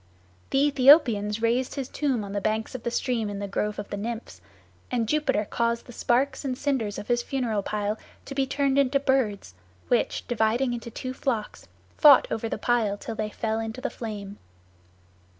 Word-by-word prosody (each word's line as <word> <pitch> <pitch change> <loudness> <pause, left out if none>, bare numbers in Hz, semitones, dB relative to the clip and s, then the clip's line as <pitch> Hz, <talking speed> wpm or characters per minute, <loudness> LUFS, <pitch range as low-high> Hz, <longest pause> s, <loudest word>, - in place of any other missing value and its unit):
The 270 +1 +3
Aethiopians 240 -7 +5
raised 245 +3 +1
his 270 -3 -3
tomb 265 -8 -1
on 200 - -7
the 200 - -1
banks 215 +3 -1
of 255 - -5
the 235 - -2
stream 235 -2 -1
in 200 - -5
the 200 0 -4
grove 210 +2 -2
of 200 - -6
the 205 - -3
Nymphs, 230 +3 -6 0.5
and 235 -3 0
Jupiter 295 -7 +1
caused 235 0 -1
the - - -11
sparks 265 +5 +1
and 260 -2 -2
cinders 255 -8 -1
of 205 - -7
his 240 -1 +2
funeral 240 -5 -1
pile 210 +1 -2 0.3
to - - -7
be 270 -1 0
turned 275 0 +1
into 275 0 +3
birds, 260 - 0 0.4
which, 240 - 0
dividing 240 +2 +1
into 235 -1 -5
two 255 +3 -5
flocks, 235 -5 -3 0.3
fought 290 -4 +8
over 225 0 -2
the - - -2
pile 215 -3 +1
till 225 - -6
they 215 -1 -3
fell 220 +1 -2
into 225 +2 -4
the - - -3
flame. 205 -3 -7
235 Hz, 185 wpm, -26 LUFS, 215-265 Hz, 0.5 s, fought